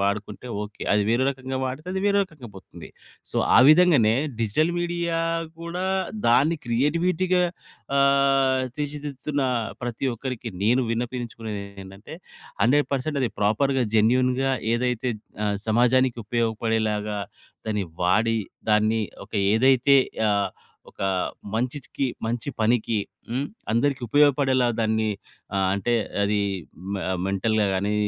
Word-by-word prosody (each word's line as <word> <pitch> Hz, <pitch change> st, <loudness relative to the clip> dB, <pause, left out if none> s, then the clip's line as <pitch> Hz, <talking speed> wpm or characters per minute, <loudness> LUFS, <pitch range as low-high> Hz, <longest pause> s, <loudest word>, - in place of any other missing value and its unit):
వాడుకుంటే 100 Hz, +4 st, -2 dB, 0.2 s
ఓకే. 105 Hz, 0 st, -10 dB
అది 105 Hz, -, +3 dB
వేరే 125 Hz, +3 st, +2 dB
రకంగా 130 Hz, -1 st, -5 dB
వాడితే 135 Hz, +6 st, -6 dB
అది 190 Hz, -, -1 dB
వేరే 200 Hz, -, +3 dB
రకంగా 150 Hz, -, -13 dB
పోతుంది. 95 Hz, -, -12 dB, 0.4 s
సో, -, -, -3 dB, 0.2 s
ఆ! -, -, +9 dB
విధంగానే 155 Hz, -10 st, +5 dB, 0.3 s
డిజిటల్ 155 Hz, +10 st, +1 dB
మీడియా 170 Hz, -1 st, -1 dB, 0.4 s
కూడా 175 Hz, +2 st, -4 dB, 0.4 s
దాన్ని 145 Hz, +7 st, +3 dB
క్రియేటివిటీగా, 170 Hz, +9 st, +1 dB, 0.6 s
ఆహ్, 135 Hz, -1 st, +3 dB
తీర్చిదిద్దుతున్న 145 Hz, -1 st, -3 dB, 0.4 s
ప్రతి 120 Hz, +2 st, -3 dB
ఒక్కరికి 125 Hz, 0 st, -5 dB, 0.2 s
నేను 115 Hz, -, +4 dB, 0.2 s
విన్నపించుకునేది 115 Hz, -3 st, -4 dB, 0.2 s
ఏంటంటే, 95 Hz, +8 st, -11 dB, 0.5 s
100% 140 Hz, +3 st, +1 dB
అది 125 Hz, -, +1 dB
ప్రోపర్‌గా 130 Hz, +6 st, +2 dB
జెన్యూన్‌గా 125 Hz, +4 st, +3 dB, 0.2 s
ఏదైతే 125 Hz, 0 st, -1 dB, 0.4 s
ఆహ్, 100 Hz, -1 st, 0 dB
సమాజానికి 125 Hz, +2 st, +3 dB
ఉపయోగపడేలాగా 110 Hz, -2 st, -1 dB, 0.5 s
దాన్ని 105 Hz, -3 st, -1 dB, 0.2 s
వాడి, 110 Hz, +5 st, +2 dB, 0.3 s
దాన్ని 110 Hz, +1 st, +3 dB, 0.2 s
ఒక -, -, -37 dB, 0.2 s
ఏదైతే 130 Hz, +3 st, +5 dB, 0.3 s
ఆహ్, 100 Hz, -2 st, +1 dB, 0.4 s
ఒక -, -, -9 dB, 0.5 s
మంచికి, 130 Hz, +3 st, -2 dB, 0.2 s
మంచి 120 Hz, +4 st, -3 dB
పనికి 115 Hz, -1 st, +2 dB, 0.3 s
హ్మ్, 130 Hz, +4 st, -1 dB, 0.3 s
అందరికి 135 Hz, +4 st, +1 dB
ఉపయోగపడేలా 135 Hz, -2 st, +3 dB
దాన్ని 110 Hz, 0 st, +1 dB, 0.5 s
ఆహ్, 95 Hz, -1 st, +2 dB
అంటే 110 Hz, +5 st, 0 dB, 0.3 s
అది 105 Hz, 0 st, +1 dB, 0.5 s
మె 95 Hz, -, -3 dB, 0.3 s
మెంటల్‌గా 105 Hz, +2 st, +1 dB
గాని, 100 Hz, +2 st, 0 dB
125 Hz, 115 wpm, -24 LUFS, 110-140 Hz, 0.6 s, ఆ